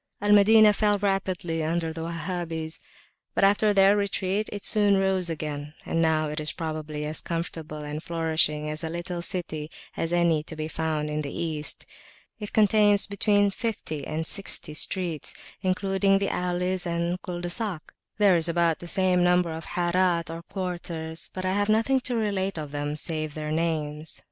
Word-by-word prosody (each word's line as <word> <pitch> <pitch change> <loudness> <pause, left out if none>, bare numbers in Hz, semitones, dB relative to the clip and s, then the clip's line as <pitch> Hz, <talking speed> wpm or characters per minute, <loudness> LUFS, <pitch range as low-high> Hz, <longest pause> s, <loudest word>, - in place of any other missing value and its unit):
Al 205 +1 +1
Madinah 210 +1 +7
fell 205 0 +2
rapidly 185 -5 -1
under 165 0 -1
the 165 - -6
Wahhabis, 165 -1 -4 0.6
but - - +2
after 205 +2 +4
their 195 0 +5
retreat, 200 0 -1
it 205 - -6
soon 205 -2 +4
rose 190 -2 +1
again, 150 -1 -5
and 165 - 0
now 160 -1 +2
it 150 +1 -3
is 155 0 -1
probably 155 -2 -4
as 155 +1 -2
comfortable 160 -2 -5
and 150 +1 -5
flourishing 160 -2 0
a 155 +1 -4
little 175 +1 -4
city 160 -4 -3 0.3
as 165 - -2
any 170 -3 +3
to 160 +1 -9
be 155 0 -3
found 155 -1 -2
in 150 0 -1
the 140 -2 -5
East. 155 -3 -2 0.5
It 210 -1 -6
contains 210 -1 +4
between 205 0 +2
fifty 195 -9 -4
and 160 +1 -2
sixty 195 -4 +1
streets, 170 0 0 0.3
including 195 +1 +2
the 195 0 0
alleys 180 0 -1
and 170 +1 -1
culs 175 -2 -5
de 175 - -2
sac. 200 -7 -3 0.2
There 205 -3 +5
is 165 0 +3
about 170 -1 +2
the 175 - -8
same 180 0 +2
number 180 -1 +3
of 160 0 -6
Harat 175 -1 +1
or 165 - -6
quarters; 170 -3 -5
but 185 0 -5
I 185 - +1
have 205 +1 0
nothing 225 +5 +3
to 250 -1 -2
relate 195 -4 -1
of 150 -2 -5
them 145 0 -3
save 155 -1 -3
their 155 -1 -4
names. 155 -1 -2
170 Hz, 175 wpm, -26 LUFS, 160-195 Hz, 0.6 s, Madinah